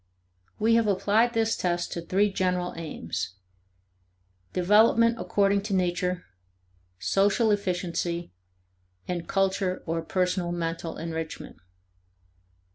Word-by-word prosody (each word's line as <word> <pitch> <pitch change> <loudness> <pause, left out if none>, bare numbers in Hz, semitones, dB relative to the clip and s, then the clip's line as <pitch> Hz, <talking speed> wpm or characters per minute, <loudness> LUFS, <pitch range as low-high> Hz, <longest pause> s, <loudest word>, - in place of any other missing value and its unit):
We 225 +2 +3
have 230 -1 +4
applied 210 +4 +2
this 225 0 +2
test 175 -1 -1
to 170 - -3
three 195 +4 +1
general 180 -1 0
aims: 95 - -5 1.2
Development 220 +5 +4
according 200 0 +2
to 195 - +1
nature, 180 0 0 0.7
social 195 - +2
efficiency, 175 -3 -2 0.8
and 175 -2 -3
culture 190 -1 0
or 165 0 -1
personal 180 +1 0
mental 165 -1 -3
enrichment. 165 -1 -5
180 Hz, 100 wpm, -27 LUFS, 170-205 Hz, 1.2 s, have